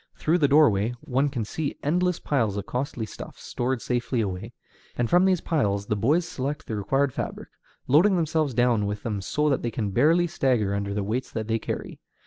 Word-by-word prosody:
Through 165 Hz, +3 st, +1 dB
the 145 Hz, -, +4 dB
doorway 120 Hz, -7 st, +4 dB
one 135 Hz, +3 st, 0 dB
can 120 Hz, -6 st, -3 dB
see 145 Hz, +6 st, -4 dB
endless 180 Hz, +4 st, +1 dB
piles 115 Hz, -8 st, 0 dB
of 100 Hz, -, -4 dB
costly 125 Hz, -2 st, -3 dB
stuffs -, -, -10 dB
stored 125 Hz, 0 st, -2 dB
safely 120 Hz, 0 st, -1 dB
away, 95 Hz, -4 st, -3 dB, 0.5 s
and 120 Hz, -, +1 dB
from 175 Hz, +6 st, +4 dB
these 185 Hz, -3 st, +2 dB
piles 100 Hz, -11 st, 0 dB
the 105 Hz, -, -1 dB
boys 150 Hz, -, +2 dB
select 145 Hz, -4 st, -4 dB
the 110 Hz, -, -4 dB
required 135 Hz, +6 st, 0 dB
fabric, -, -, -5 dB, 0.4 s
loading 170 Hz, +9 st, +5 dB
themselves 155 Hz, -5 st, 0 dB
down 120 Hz, -4 st, +2 dB
with 105 Hz, 0 st, -4 dB
them 105 Hz, -4 st, -2 dB
so 150 Hz, +10 st, 0 dB
that 135 Hz, -, +1 dB
they 120 Hz, -, -1 dB
can 110 Hz, -3 st, -3 dB
barely 160 Hz, -, +4 dB
stagger 125 Hz, -, +1 dB
under 100 Hz, 0 st, -2 dB
the 105 Hz, -, -1 dB
weights 115 Hz, +6 st, -2 dB
that 110 Hz, -1 st, -4 dB
they 115 Hz, 0 st, 0 dB
carry. -, -, -5 dB
125 Hz, 200 wpm, -25 LUFS, 105-150 Hz, 0.5 s, loading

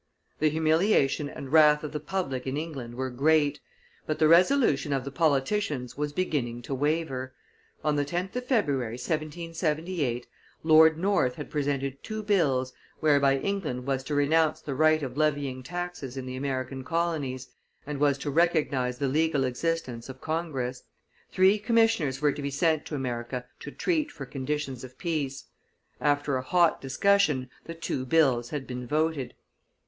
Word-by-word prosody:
The 155 Hz, -, +3 dB
humiliation 155 Hz, -2 st, +2 dB
and 135 Hz, -1 st, -8 dB
wrath 150 Hz, -1 st, +6 dB
of 150 Hz, -, -4 dB
the 150 Hz, -, -3 dB
public 140 Hz, -7 st, -3 dB
in 130 Hz, +2 st, -2 dB
England 140 Hz, -7 st, -5 dB
were 130 Hz, +1 st, -3 dB
great, 145 Hz, +2 st, +2 dB, 0.5 s
but 155 Hz, -, -1 dB
the 155 Hz, 0 st, +4 dB
resolution 170 Hz, -, +4 dB
of 135 Hz, -2 st, -1 dB
the 140 Hz, -, -5 dB
politicians 145 Hz, -, 0 dB
was 150 Hz, 0 st, -2 dB
beginning 130 Hz, -8 st, -2 dB
to 135 Hz, -, -4 dB
waver; 135 Hz, -2 st, -1 dB, 0.5 s
on 150 Hz, -1 st, +1 dB
the 145 Hz, -, +2 dB
10th 175 Hz, -, -3 dB
of 250 Hz, 0 st, -3 dB
February, 140 Hz, -, 0 dB
1778, 155 Hz, -2 st, -2 dB, 0.4 s
Lord 160 Hz, 0 st, +6 dB
North 180 Hz, -9 st, +1 dB
had 150 Hz, -, -8 dB
presented 140 Hz, -2 st, -2 dB
two 215 Hz, -1 st, -5 dB
bills 135 Hz, -11 st, +1 dB, 0.3 s
whereby 140 Hz, -3 st, +4 dB
England 150 Hz, -7 st, -3 dB
was 135 Hz, -1 st, -1 dB
to 150 Hz, -, -2 dB
renounce 155 Hz, +2 st, +3 dB
the 140 Hz, -, -5 dB
right 155 Hz, +2 st, +3 dB
of 130 Hz, 0 st, -5 dB
levying 145 Hz, -4 st, 0 dB
taxes 175 Hz, -4 st, -5 dB
in 130 Hz, -, -4 dB
the 130 Hz, 0 st, -5 dB
American 130 Hz, 0 st, -3 dB
colonies, 145 Hz, -5 st, -2 dB, 0.4 s
and 145 Hz, -1 st, -4 dB
was 140 Hz, -1 st, +3 dB
to 140 Hz, +1 st, -4 dB
recognize 145 Hz, -6 st, +1 dB
the 140 Hz, -, 0 dB
legal 150 Hz, 0 st, +1 dB
existence 130 Hz, -2 st, -2 dB
of 130 Hz, 0 st, -9 dB
Congress. 140 Hz, -6 st, -3 dB, 0.5 s
Three 190 Hz, +3 st, +4 dB
commissioners 215 Hz, -, +2 dB
were 145 Hz, -, +5 dB
to 145 Hz, -, -6 dB
be 140 Hz, -, -2 dB
sent 155 Hz, +2 st, +1 dB
to 150 Hz, -, -4 dB
America 125 Hz, -1 st, -3 dB
to -, -, -7 dB
treat 315 Hz, -4 st, -1 dB
for -, -, -8 dB
conditions 135 Hz, -2 st, -4 dB
of 130 Hz, 0 st, -11 dB
peace. 150 Hz, -6 st, -3 dB, 0.5 s
After 145 Hz, -2 st, +1 dB
a -, -, -2 dB
hot 170 Hz, +5 st, +2 dB
discussion, 140 Hz, -3 st, +2 dB
the 165 Hz, -, -7 dB
two 165 Hz, -5 st, -3 dB
bills 130 Hz, -6 st, +3 dB
had 145 Hz, -3 st, -4 dB
been 125 Hz, -1 st, -6 dB
voted. 155 Hz, -1 st, -1 dB
145 Hz, 160 wpm, -27 LUFS, 130-165 Hz, 0.5 s, wrath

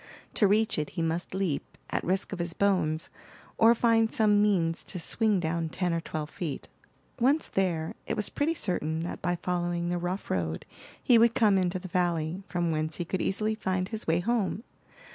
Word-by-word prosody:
To 205 Hz, -, +4 dB
reach 215 Hz, -2 st, +2 dB
it 150 Hz, -, -2 dB
he 165 Hz, -, +1 dB
must 165 Hz, +3 st, -2 dB
leap, 185 Hz, -7 st, -2 dB
at -, -, -1 dB
risk 190 Hz, +3 st, -1 dB
of 190 Hz, -, -5 dB
his 170 Hz, 0 st, -2 dB
bones, 170 Hz, -6 st, +1 dB, 0.5 s
or 230 Hz, +1 st, +7 dB
find 225 Hz, -1 st, +3 dB
some 210 Hz, -2 st, +4 dB
means 175 Hz, -6 st, +2 dB
to -, -, -5 dB
swing 210 Hz, +3 st, +2 dB
down 165 Hz, -1 st, -1 dB
ten 180 Hz, +1 st, -1 dB
or 165 Hz, -, -1 dB
twelve 155 Hz, -1 st, -5 dB
feet. 160 Hz, -6 st, -5 dB, 0.5 s
Once 275 Hz, +6 st, +3 dB
there, 170 Hz, -4 st, -1 dB
it -, -, -1 dB
was 210 Hz, -, 0 dB
pretty 315 Hz, +3 st, 0 dB
certain 160 Hz, -, -1 dB
that 170 Hz, -, -5 dB
by 175 Hz, 0 st, 0 dB
following 175 Hz, -1 st, -1 dB
the 175 Hz, 0 st, -1 dB
rough 180 Hz, +3 st, -3 dB
road 80 Hz, -3 st, -2 dB, 0.4 s
he 240 Hz, -2 st, +6 dB
would 235 Hz, 0 st, +4 dB
come 215 Hz, -6 st, +4 dB
into 185 Hz, -1 st, +1 dB
the 185 Hz, +1 st, -7 dB
valley, 175 Hz, -1 st, 0 dB
from 175 Hz, -2 st, 0 dB
whence 155 Hz, 0 st, -1 dB
he 175 Hz, -, -3 dB
could 185 Hz, +2 st, -2 dB
easily 215 Hz, +3 st, 0 dB
find 185 Hz, -3 st, -2 dB
his 220 Hz, -1 st, -5 dB
way 165 Hz, +2 st, +2 dB
home. 225 Hz, 0 st, 0 dB
180 Hz, 195 wpm, -28 LUFS, 165-210 Hz, 0.5 s, or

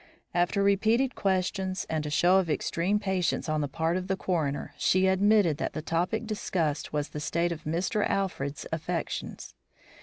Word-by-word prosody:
After 175 Hz, +3 st, +2 dB
repeated 220 Hz, +6 st, +3 dB
questions 190 Hz, 0 st, -1 dB
and 155 Hz, -1 st, -2 dB
a -, -, -2 dB
show 175 Hz, +5 st, +4 dB
of 180 Hz, -3 st, -1 dB
extreme 170 Hz, +6 st, 0 dB
patience 190 Hz, -6 st, -1 dB
on 155 Hz, -1 st, 0 dB
the 145 Hz, -, -1 dB
part 165 Hz, +4 st, 0 dB
of 185 Hz, 0 st, -4 dB
the 190 Hz, 0 st, 0 dB
coroner, 160 Hz, -7 st, -2 dB
she 185 Hz, +1 st, +3 dB
admitted 190 Hz, -4 st, +4 dB
that -, -, -3 dB
the 155 Hz, -, -4 dB
topic 180 Hz, +8 st, -1 dB
discussed 170 Hz, -8 st, -2 dB
was 150 Hz, -1 st, -2 dB
the 150 Hz, -, -6 dB
state 170 Hz, +3 st, 0 dB
of 165 Hz, -2 st, -6 dB
Mr. 180 Hz, +7 st, 0 dB
Alfred's 150 Hz, -8 st, -2 dB
affections. 165 Hz, +1 st, -4 dB
180 Hz, 170 wpm, -28 LUFS, 160-195 Hz, -, show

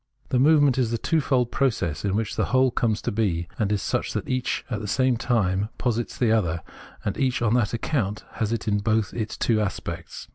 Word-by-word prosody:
The 125 Hz, -, +2 dB
movement 145 Hz, -2 st, +5 dB
is 120 Hz, -3 st, +2 dB
the 115 Hz, -, -1 dB
twofold 130 Hz, -4 st, +1 dB
process 110 Hz, -, 0 dB
in 100 Hz, -1 st, 0 dB
which 110 Hz, -1 st, -1 dB
the -, -, +1 dB
whole 130 Hz, 0 st, +3 dB
comes 110 Hz, -3 st, 0 dB
to -, -, -1 dB
be, 95 Hz, -6 st, 0 dB
and 105 Hz, -2 st, +1 dB
is 105 Hz, -2 st, 0 dB
such -, -, -1 dB
that -, -, -3 dB
each 130 Hz, -1 st, -1 dB
at 115 Hz, -5 st, -3 dB
the 105 Hz, -, -5 dB
same 130 Hz, +3 st, +2 dB
time 105 Hz, -4 st, 0 dB
posits 120 Hz, -2 st, -1 dB
the 120 Hz, -3 st, +2 dB
other, 85 Hz, -7 st, +1 dB, 0.4 s
and 105 Hz, -, -1 dB
each 130 Hz, -2 st, +1 dB
on 115 Hz, -1 st, +2 dB
that 120 Hz, -3 st, +2 dB
account 115 Hz, -4 st, -2 dB
has 110 Hz, -1 st, -2 dB
in 110 Hz, -3 st, 0 dB
it 100 Hz, -, -4 dB
both 110 Hz, -2 st, +1 dB
as 120 Hz, -, -2 dB
its 110 Hz, -, -4 dB
two 110 Hz, -2 st, +2 dB
aspects. 105 Hz, -, -5 dB
115 Hz, 220 wpm, -25 LUFS, 105-125 Hz, 0.4 s, movement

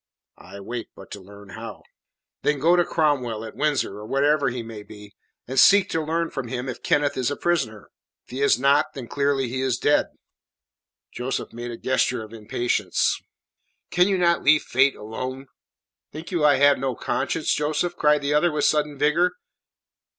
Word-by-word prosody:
"I 100 Hz, -, -12 dB
wait 115 Hz, +3 st, -6 dB
but -, -, -14 dB
to 100 Hz, -, -8 dB
learn 100 Hz, +1 st, -14 dB
how." 90 Hz, -, -9 dB, 0.6 s
"Then 150 Hz, -, +1 dB
go 165 Hz, +6 st, +4 dB
to 175 Hz, -, +4 dB
Cromwell, 130 Hz, -10 st, -1 dB
at 110 Hz, -, -10 dB
Windsor 145 Hz, -9 st, -1 dB
or 105 Hz, -, -9 dB
wherever 140 Hz, +1 st, +2 dB
he 120 Hz, -1 st, -5 dB
may 115 Hz, -2 st, -9 dB
be, 105 Hz, 0 st, -13 dB, 0.3 s
and 130 Hz, +1 st, 0 dB
seek 200 Hz, +6 st, +6 dB
to 160 Hz, -, 0 dB
learn 165 Hz, +2 st, -1 dB
from 135 Hz, -3 st, -5 dB
him 125 Hz, +2 st, -4 dB
if 130 Hz, -, -6 dB
Kenneth 145 Hz, -1 st, +1 dB
is 130 Hz, -1 st, 0 dB
a 145 Hz, -, -2 dB
prisoner. 130 Hz, -, -2 dB, 0.3 s
If -, -, -19 dB
he 130 Hz, +2 st, -4 dB
is 140 Hz, -, +4 dB
not, 140 Hz, +3 st, +2 dB
then 130 Hz, -4 st, -7 dB
clearly 140 Hz, -1 st, 0 dB
he 130 Hz, +2 st, -3 dB
is 130 Hz, -2 st, 0 dB
dead." 145 Hz, -, +2 dB, 1.0 s
Joseph 125 Hz, +2 st, -4 dB
made 120 Hz, +1 st, -6 dB
a 120 Hz, -, -6 dB
gesture 125 Hz, -2 st, 0 dB
of 110 Hz, +1 st, -12 dB
impatience. 115 Hz, +2 st, -1 dB, 0.7 s
"Can 180 Hz, +1 st, +4 dB
you 195 Hz, -1 st, +1 dB
not 170 Hz, -1 st, +2 dB
leave 150 Hz, +1 st, +4 dB
Fate 135 Hz, +2 st, +2 dB
alone?" 130 Hz, +5 st, -6 dB, 0.7 s
"Think 160 Hz, +4 st, -9 dB
you 170 Hz, -4 st, 0 dB
I 150 Hz, -1 st, +6 dB
have 145 Hz, +1 st, +4 dB
no 130 Hz, -2 st, -2 dB
conscience, 160 Hz, -, -1 dB
Joseph?" 155 Hz, +4 st, -1 dB
cried 150 Hz, -1 st, +2 dB
the 140 Hz, +1 st, 0 dB
other 155 Hz, +3 st, +3 dB
with 150 Hz, -1 st, 0 dB
sudden 150 Hz, -1 st, +1 dB
vigour. 165 Hz, +6 st, +2 dB
135 Hz, 185 wpm, -23 LUFS, 120-150 Hz, 1.0 s, seek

